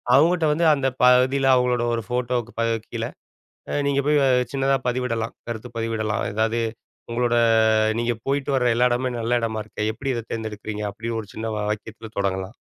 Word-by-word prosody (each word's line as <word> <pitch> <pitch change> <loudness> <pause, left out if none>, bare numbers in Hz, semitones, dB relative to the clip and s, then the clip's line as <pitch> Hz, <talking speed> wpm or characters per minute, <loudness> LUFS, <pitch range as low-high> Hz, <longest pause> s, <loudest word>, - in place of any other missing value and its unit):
அவுங்கட்ட 165 +4 +4
வந்து 165 +3 +1
அந்த 135 -2 0 0.2
பகுதியில 130 +2 +4
அவுங்களோட 125 -1 +2
ஒரு 115 -1 -2
ஃபோட்டோவுக்கு 125 -1 -1
ப - - +2 0.3
கீழ - - -4 0.7
அ - - -3
நீங்க 140 0 +2
போய் 150 0 +4 0.3
சின்னதா 135 0 +2
பதிவிடலாம். 120 -2 -2
கருத்து 120 +1 -5
பதிவிடலாம். 110 -2 -1
அதாவது 110 +2 +1 0.5
உங்களோட 120 0 +1 0.7
நீங்க 120 0 +1
போயிட்டு 140 0 0
வர்ற 125 -2 +2
எல்லா 125 +1 +4
இடமும் 125 0 -1
நல்ல 120 +2 +1
இடமா 110 -1 -2
இருக்கே! 105 - -3
எப்படி 135 +4 -3
இத 115 - -4
தேர்ந்தெடுக்கறீங்க, 110 -1 -4
அப்படி 110 +4 -6
ஒரு 105 - -11
சின்ன 110 +1 -4
வ - - -2
வாக்கியத்தில 110 +1 -6
தொடங்கலாம். 95 +1 -2
120 Hz, 165 wpm, -23 LUFS, 110-130 Hz, 0.7 s, அவுங்கட்ட